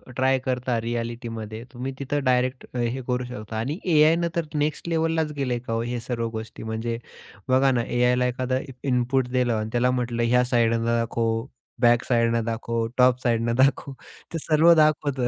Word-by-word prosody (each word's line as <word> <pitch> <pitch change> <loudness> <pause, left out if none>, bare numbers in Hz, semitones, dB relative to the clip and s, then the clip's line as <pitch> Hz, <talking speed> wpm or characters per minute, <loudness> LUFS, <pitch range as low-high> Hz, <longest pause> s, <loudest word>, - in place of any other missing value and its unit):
Try 130 0 +3
करता 125 -2 -1
रिअ‍ॅलिटीमध्ये 115 -1 -5
तुम्ही 130 +2 -4
तिथं 140 +1 -2
डायरेक्ट 125 0 +1
अ, - - -4
हे 120 +2 -1
करू 125 0 0
शकता 110 -3 -7
आणि 135 +9 -2 0.2
एआयने 160 +3 +4
तर 170 -2 0
नेक्स्ट 150 +3 -1
लेव्हललाच 160 -1 0
गेलय 125 -3 -1
का 115 0 -1
हे 120 0 -3
सर्व 115 -1 -3
गोष्टी, 110 0 -7
म्हणजे 110 +1 -3 0.5
बघा 135 +1 +4
ना 120 -2 +1
एआयला 125 +1 +2
एखादं 130 +1 -1 0.2
इनपुट 125 0 +1
दिलं 125 -2 +1
आणि 110 0 -2
त्याला 125 +1 +2
म्हटलं 120 -2 -1
ह्या 125 +1 +3
साइडने 115 -2 +2
दाखव, 115 0 0 0.4
बॅक 120 0 +4
साइडने 115 -1 +2
दाखव, 115 0 -2
टॉप 125 0 +4
साइडने 115 -1 +1
दाखव. 140 0 +1 0.4
ते - - -1
सर्व 160 +2 +5
दाखवतं. 145 -5 +2
125 Hz, 165 wpm, -24 LUFS, 115-130 Hz, 0.5 s, सर्व